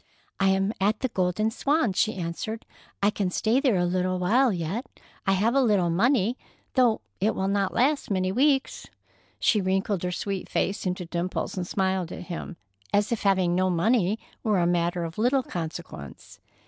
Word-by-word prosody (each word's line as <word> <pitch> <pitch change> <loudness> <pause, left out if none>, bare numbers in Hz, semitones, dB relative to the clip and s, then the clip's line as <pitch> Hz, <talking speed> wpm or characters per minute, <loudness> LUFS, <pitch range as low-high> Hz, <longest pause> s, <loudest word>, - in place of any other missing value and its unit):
"I 195 - +3
am 195 +2 +1
at 210 +3 +1
the 260 - 0
Golden 190 +2 0
Swan," 280 -3 +1
she 215 +4 +1
answered. 185 +5 -4 0.4
"I 205 - +4
can 200 -3 -1
stay 220 +7 +1
there 265 -6 +2
a 175 - +2
little 185 +1 0
while 235 +8 +3
yet. 185 - -3 0.4
I 195 - +4
have 215 +5 +2
a 275 - +4
little 200 -8 +2
money, 235 +4 +2 0.3
though 245 -4 +3 0.2
it 210 +4 +1
will 190 - -1
not 200 -1 +1
last 280 +4 +2
many 185 -2 0
weeks." 270 +4 +1 0.5
She 210 - +3
wrinkled 190 0 0
her 180 - -2
sweet 195 +2 -4
face 195 0 -1
into 180 0 -2
dimples 175 +2 -3
and 180 -2 -3
smiled 190 -3 -1
at - - -6
him, 175 0 -6 0.3
as 205 +2 +2
if 235 - -1
having 190 -3 +2
no 185 +1 +2
money 200 +3 +2 0.2
were 215 -3 +1
a 175 - +2
matter 175 0 +1
of 165 +3 -6
little 255 +4 +3
consequence. 160 - -7
195 Hz, 180 wpm, -26 LUFS, 180-220 Hz, 0.5 s, I